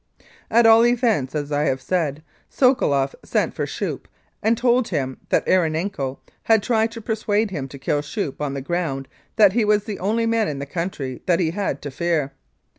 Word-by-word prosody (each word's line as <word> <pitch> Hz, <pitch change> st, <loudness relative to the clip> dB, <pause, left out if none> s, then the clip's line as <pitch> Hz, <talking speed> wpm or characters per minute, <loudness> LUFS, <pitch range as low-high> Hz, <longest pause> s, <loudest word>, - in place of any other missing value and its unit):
At 235 Hz, +1 st, +4 dB
all 225 Hz, 0 st, +7 dB
events, 230 Hz, -, +1 dB
as 145 Hz, -1 st, -3 dB
I 145 Hz, +1 st, +1 dB
have 135 Hz, -2 st, 0 dB
said, 155 Hz, -2 st, -2 dB, 0.3 s
Sokoloff 140 Hz, -, +2 dB
sent -, -, 0 dB
for -, -, -3 dB
Schoeppe -, -, -4 dB, 0.3 s
and 225 Hz, +2 st, +2 dB
told 245 Hz, 0 st, +2 dB
him 135 Hz, -7 st, -3 dB
that -, -, +2 dB
Erenenko 160 Hz, -5 st, 0 dB, 0.3 s
had 220 Hz, -3 st, +4 dB
tried 225 Hz, -1 st, +1 dB
to 230 Hz, -, -7 dB
persuade 215 Hz, -1 st, 0 dB
him 145 Hz, -7 st, -4 dB
to 140 Hz, -, -10 dB
kill 145 Hz, +2 st, -1 dB
Schoeppe 150 Hz, -2 st, -4 dB
on 140 Hz, -2 st, -2 dB
the 135 Hz, -, -3 dB
ground 140 Hz, -4 st, -2 dB, 0.3 s
that 205 Hz, -3 st, +6 dB
he 235 Hz, 0 st, +2 dB
was 210 Hz, -1 st, +3 dB
the 210 Hz, -2 st, -6 dB
only 220 Hz, +5 st, 0 dB
man 225 Hz, -2 st, +1 dB
in 145 Hz, -, -3 dB
the 140 Hz, -, -4 dB
country 145 Hz, -5 st, -4 dB
that 175 Hz, -2 st, +3 dB
he 165 Hz, -3 st, +1 dB
had 190 Hz, -7 st, -3 dB
to 145 Hz, -, -5 dB
fear. 155 Hz, -1 st, -1 dB
175 Hz, 190 wpm, -22 LUFS, 145-220 Hz, 0.3 s, all